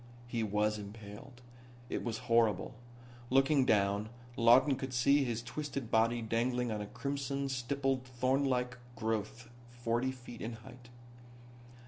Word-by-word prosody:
He 120 Hz, -1 st, -2 dB
was 105 Hz, 0 st, +1 dB
impaled. 105 Hz, +4 st, -10 dB, 0.5 s
It -, -, -3 dB
was 115 Hz, -2 st, -2 dB
horrible. 115 Hz, -4 st, +2 dB, 0.6 s
Looking 135 Hz, +1 st, +4 dB
down 100 Hz, +1 st, +2 dB, 0.3 s
Lawton 125 Hz, +4 st, +6 dB
could 130 Hz, 0 st, -5 dB
see 140 Hz, +3 st, +4 dB
his 120 Hz, -2 st, -2 dB
twisted 140 Hz, -2 st, -5 dB
body 115 Hz, +1 st, +3 dB
dangling 120 Hz, +2 st, 0 dB
on 105 Hz, -1 st, -2 dB
a 105 Hz, -, -5 dB
crimson 140 Hz, +2 st, -3 dB
stippled 135 Hz, 0 st, -1 dB
thornlike 125 Hz, 0 st, 0 dB, 0.2 s
growth 110 Hz, +1 st, -3 dB, 0.2 s
forty 120 Hz, +1 st, -1 dB
feet 120 Hz, -2 st, -10 dB
in 115 Hz, +2 st, -4 dB
height. 120 Hz, +2 st, -13 dB
120 Hz, 125 wpm, -33 LUFS, 110-130 Hz, 0.6 s, Lawton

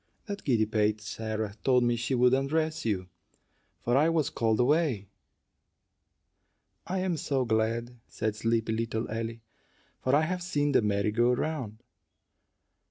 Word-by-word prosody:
That 200 Hz, -2 st, -6 dB
giddy 115 Hz, -6 st, +2 dB
pate 105 Hz, 0 st, +1 dB
Sarah 110 Hz, -1 st, -4 dB
told 125 Hz, -2 st, +4 dB
me 120 Hz, 0 st, +2 dB
she 120 Hz, +3 st, -1 dB
would 125 Hz, +1 st, +4 dB
undress 155 Hz, +3 st, 0 dB
you, 95 Hz, -5 st, -1 dB, 0.7 s
for 120 Hz, -, 0 dB
I 150 Hz, +4 st, +4 dB
was 160 Hz, -4 st, +1 dB
called 110 Hz, -2 st, +1 dB
away." 125 Hz, -, +2 dB, 1.8 s
"I 185 Hz, -, -1 dB
am 185 Hz, -2 st, 0 dB
so 135 Hz, -3 st, 0 dB
glad," 115 Hz, +2 st, -1 dB
said 110 Hz, -1 st, -2 dB
sleepy 115 Hz, +1 st, 0 dB
little 115 Hz, 0 st, -2 dB
Ellie, 115 Hz, +1 st, -4 dB, 0.6 s
"for 130 Hz, +2 st, +2 dB
I 150 Hz, -, +4 dB
have 180 Hz, +3 st, -1 dB
seen 145 Hz, -5 st, 0 dB
the -, -, +4 dB
merry 105 Hz, 0 st, +1 dB
go 120 Hz, +3 st, +3 dB
round." 125 Hz, -6 st, -3 dB
120 Hz, 145 wpm, -29 LUFS, 110-145 Hz, 1.8 s, told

